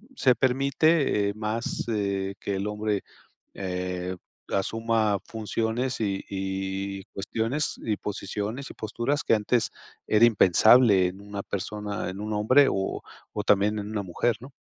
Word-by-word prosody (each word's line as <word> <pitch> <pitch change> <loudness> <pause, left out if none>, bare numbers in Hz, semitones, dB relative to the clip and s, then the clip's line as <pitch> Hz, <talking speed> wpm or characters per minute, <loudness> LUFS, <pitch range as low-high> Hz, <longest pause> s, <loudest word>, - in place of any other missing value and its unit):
se 130 - +4
permite, 135 -2 +2
eh, - - -3
más, 110 +2 -2
eh, 100 -2 -1
que 100 - -2
el 100 +2 -2
hombre, 105 -1 -1 0.5
eh, 90 -1 -3 0.4
asuma 110 0 +1
funciones 115 +3 -2
y 100 -2 -1
y 95 0 -3
cuestiones 115 +8 -2
y 110 -3 -1
posiciones 105 +5 -4
y - - -9
posturas 120 +7 -2
que - - +3
antes 110 +2 +1 0.4
era 110 +2 +4
impensable 105 -1 +6
en 90 +2 -7
una 100 0 -6
persona, 105 0 -4
en 95 - -8
un 110 +1 -4
hombre, 130 +7 +5
o 95 0 -2 0.3
o 105 - -2
también 105 +1 +3
en 105 0 -5
una 105 -2 -2
mujer, 100 +6 0
¿no? 135 +2 -11
105 Hz, 145 wpm, -26 LUFS, 100-115 Hz, 0.5 s, impensable